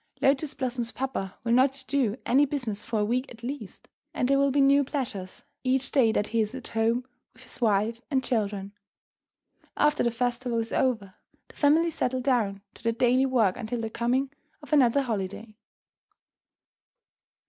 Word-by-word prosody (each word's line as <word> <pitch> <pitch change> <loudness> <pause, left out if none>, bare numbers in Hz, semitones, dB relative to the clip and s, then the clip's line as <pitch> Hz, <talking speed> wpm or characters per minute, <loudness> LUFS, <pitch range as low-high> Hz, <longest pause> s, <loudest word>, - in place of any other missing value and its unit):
Lotus 275 +2 +2
Blossom's 245 -2 -2
papa 255 -8 -4
will 230 - -1
not 260 +2 +3
do 260 -6 +1
any 270 +4 +4
business 245 -8 -3
for 220 -2 -1
a - - +2
week 250 +5 0
at 230 -1 -13
least, 275 +4 -7 0.3
and 250 - +1
there 275 +1 +3
will 280 0 +3
be 280 +1 +1
new 280 +1 +5
pleasures 235 -10 -5 0.2
each 260 +1 +1
day 245 -6 +4
that 210 -1 -1
he 230 0 +1
is 215 +3 -2
at 260 - -8
home 230 +2 +1 0.3
with - - -17
his - - -9
wife 220 +1 +1
and 265 -3 +1
children. 205 -5 -2 1.1
After 295 0 +3
the 240 - +3
festival 240 0 -1
is 225 0 -2
over, 220 -7 0 0.4
the - - -17
family 320 +3 +3
settle 255 -3 -1
down 220 -7 0
to - - -17
their 230 0 0
daily 255 +3 +3
work 225 -8 +2
until 240 0 -4
the 225 -1 -4
coming 255 +4 0 0.3
of 295 - -7
another 275 -1 +4
holiday. 215 -1 -4
245 Hz, 170 wpm, -27 LUFS, 225-270 Hz, 1.1 s, new